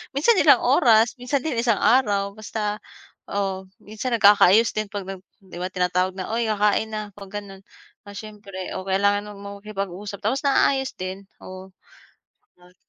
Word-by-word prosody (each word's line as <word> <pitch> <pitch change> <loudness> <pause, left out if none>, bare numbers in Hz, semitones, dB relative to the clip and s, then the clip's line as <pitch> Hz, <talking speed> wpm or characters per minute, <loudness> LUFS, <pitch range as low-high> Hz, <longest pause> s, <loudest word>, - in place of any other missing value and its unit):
Minsan 375 +10 +3
ilang - - +6
oras, 225 -1 +4
minsan 250 +2 -1
din 300 -7 -2
isang 230 -3 +1
araw, 205 -6 +3
basta 210 0 -3 0.5
o, 195 -1 -3 0.2
minsan 220 +5 -6
nagkakaayos 205 0 +5
din 215 0 -1
'pag 200 -2 -5
nag 190 -1 -8 0.2
'di 190 -3 -15
ba, 185 +1 -4
tinatawag 180 0 0
na, 185 -1 -6
"Oy, 235 - 0
kakain 210 +1 +1
na", 215 0 -3
'pag 200 -1 -12
gano'n, 195 -1 -13 0.4
ah, 205 - -11
siyempre, 200 -3 -8
o 185 - -4
kailangan 200 +2 +1
mong 200 0 -10
makipag-usap, 200 -1 -6
tapos 260 +7 -1
naayos 270 -1 +2
din, 185 +2 -5 0.2
oo, 185 0 -11 0.9
at 180 +1 -21
205 Hz, 160 wpm, -23 LUFS, 190-220 Hz, 0.9 s, ilang